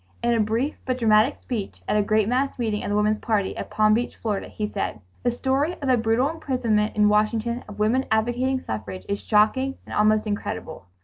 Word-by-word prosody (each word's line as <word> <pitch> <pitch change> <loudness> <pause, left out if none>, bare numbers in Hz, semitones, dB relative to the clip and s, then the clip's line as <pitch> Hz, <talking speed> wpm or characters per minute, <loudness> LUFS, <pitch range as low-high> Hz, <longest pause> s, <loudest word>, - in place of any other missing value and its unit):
In 240 0 +3
a 230 - +1
brief 225 +7 0
but 255 -1 -1
dramatic 225 +2 +3
speech 220 -6 -5
at - - +1
a 210 - +4
great 215 0 +2
mass 260 +4 0
meeting 220 -4 -1
of - - -3
the 205 - 0
Woman's 210 +1 +2
Party, 210 -4 0
at - - -6
Palm 215 0 +3
Beach, 240 +2 -1
Florida, 210 -3 -2
he 210 - -4
said: 200 - -3 0.2
"The 245 - +1
story 270 +6 0
of 280 - -6
the 255 - +5
brutal 230 +3 +2
imprisonment 250 -9 0
in 210 -1 +4
Washington 220 +3 +1
of 205 - -9
women 230 +5 +2
advocating 240 +4 +1
suffrage 105 -4 -6
is 200 0 -2
shocking 260 +6 +2
and - - -9
almost 215 +1 +3
incredible. 205 - -5
220 Hz, 205 wpm, -24 LUFS, 210-250 Hz, 0.2 s, the